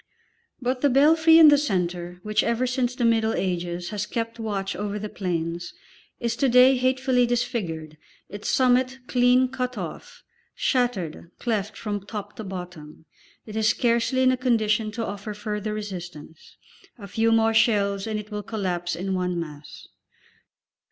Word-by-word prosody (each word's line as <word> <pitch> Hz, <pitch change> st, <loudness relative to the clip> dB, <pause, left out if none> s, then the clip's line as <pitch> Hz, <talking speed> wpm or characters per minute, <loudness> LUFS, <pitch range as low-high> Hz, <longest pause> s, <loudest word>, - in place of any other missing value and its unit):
But 250 Hz, 0 st, -2 dB
the 285 Hz, -, +4 dB
belfry 320 Hz, +5 st, +5 dB
in 320 Hz, -2 st, +9 dB
the 290 Hz, -1 st, +5 dB
centre, 180 Hz, -8 st, -2 dB
which 215 Hz, 0 st, +1 dB
ever 235 Hz, +2 st, 0 dB
since 250 Hz, -1 st, -1 dB
the 245 Hz, -, 0 dB
Middle 225 Hz, -1 st, +2 dB
Ages 175 Hz, -1 st, -2 dB
has 210 Hz, -1 st, -3 dB
kept 230 Hz, +1 st, -4 dB
watch 200 Hz, -3 st, -3 dB
over 205 Hz, +1 st, -3 dB
the 210 Hz, 0 st, -5 dB
plains, 170 Hz, -3 st, -3 dB, 0.4 s
is 235 Hz, -1 st, -1 dB
to 275 Hz, -, +2 dB
day 250 Hz, +2 st, +6 dB
hatefully 255 Hz, -1 st, +2 dB
disfigured, 175 Hz, -, -3 dB, 0.3 s
its 205 Hz, +1 st, -6 dB
summit 255 Hz, 0 st, +2 dB
clean 250 Hz, +1 st, +3 dB
cut 255 Hz, -1 st, -4 dB
off, -, -, -8 dB, 0.3 s
shattered, 200 Hz, -, -1 dB
cleft 215 Hz, -3 st, -2 dB
from 205 Hz, -2 st, -4 dB
top 205 Hz, 0 st, -7 dB
to 220 Hz, -, -5 dB
bottom. 180 Hz, -5 st, -9 dB, 0.4 s
It 215 Hz, -, -9 dB
is 220 Hz, 0 st, +1 dB
scarcely 240 Hz, +2 st, +1 dB
in 255 Hz, -, +5 dB
a 255 Hz, -, 0 dB
condition 220 Hz, -4 st, +1 dB
to 230 Hz, +1 st, -3 dB
offer 205 Hz, +1 st, -6 dB
further 210 Hz, 0 st, -4 dB
resistance; 175 Hz, -7 st, -8 dB, 0.4 s
a 200 Hz, -4 st, -9 dB
few 225 Hz, +4 st, +1 dB
more 225 Hz, 0 st, +3 dB
shells, 200 Hz, -3 st, +2 dB
and 215 Hz, -1 st, -2 dB
it 210 Hz, +1 st, -10 dB
will 210 Hz, 0 st, -3 dB
collapse 185 Hz, -5 st, -3 dB
in 190 Hz, +2 st, -3 dB
one 180 Hz, -1 st, -1 dB
mass. 150 Hz, -3 st, -9 dB
215 Hz, 160 wpm, -24 LUFS, 190-245 Hz, 0.4 s, in